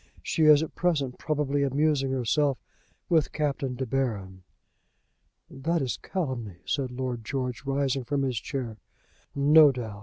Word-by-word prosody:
She 160 - +1
is 150 0 +7
at 160 - -6
present 145 -8 -1
probably 145 -2 0
amusing 140 0 +1
herself 135 +2 +1 0.5
with 160 -4 +2
Captain 140 -4 -2
De 130 +1 -3
Baron." 105 -8 -2 1.1
"That 160 +3 -1
is 130 - -2
calumny," 120 - -4
said 135 -3 -1
Lord 125 -2 -4
George, 125 +1 -3
rising 135 -1 0
from 140 +1 -1
his 125 -4 -1
chair. 125 -6 -5 0.6
"No 145 +1 +7
doubt. 110 -5 -6
135 Hz, 140 wpm, -27 LUFS, 125-150 Hz, 1.1 s, is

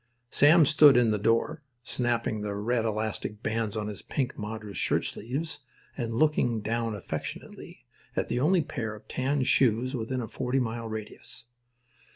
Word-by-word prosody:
Sam 155 +3 +6
stood 150 -2 +7
in 120 -2 +4
the 105 - 0
door, 115 +9 +1 0.2
snapping 120 -3 -1
the 105 -1 -3
red 115 +3 0
elastic 110 0 -3
bands 110 -1 -1
on 105 - -2
his 105 -2 -6
pink 130 -3 -2
madras 105 -1 -6
shirtsleeves 145 +7 -2 0.4
and 115 -3 -3
looking 125 -6 +2
down 115 +1 -1
affectionately 100 - -7 0.3
at - - 0
the 120 - -1
only 165 +5 +3
pair 115 -8 -4
of 105 - -15
tan 135 +1 0
shoes 130 +1 +2
within 125 +2 -3
a 115 - -4
forty 130 +3 -1
mile 115 -2 -3
radius. 110 0 -8
115 Hz, 155 wpm, -28 LUFS, 110-130 Hz, 0.4 s, stood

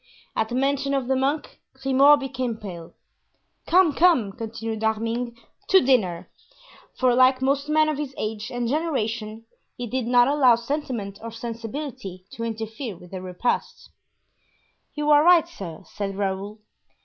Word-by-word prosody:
At 220 - 0
the 240 - -3
mention 275 +1 +1
of 265 -3 -1
the 265 - +2
monk, 275 +3 -1 0.2
Grimaud 270 +2 +5
became 255 -4 -3
pale. 175 -6 -9 0.7
"Come, 350 -3 +5
come," 315 - +4
continued 225 0 -5
D'Arminges, 230 +2 -1 0.3
"to 385 - +7
dinner;" 190 - +1 0.7
for 255 -1 +3
like 255 +1 +5
most 275 +2 0
men 310 0 +4
of 305 -2 -1
his 275 -3 -5
age 215 0 -4
and 245 -1 -2
generation 230 -7 -2 0.3
he 245 - -4
did 245 0 -2
not 245 0 +5
allow 275 -4 +5
sentiment 235 -5 -4
or 230 - -6
sensibility 230 -3 -6
to 230 - -6
interfere 225 -1 -5
with 180 +1 -15
a 185 - -5
repast. 185 +6 -3 1.0
"You 300 0 +1
are 295 0 +7
right, 340 -1 +6
sir," 185 - -9
said 195 -1 -5
Raoul. 200 +1 -3
245 Hz, 150 wpm, -24 LUFS, 220-275 Hz, 1.0 s, to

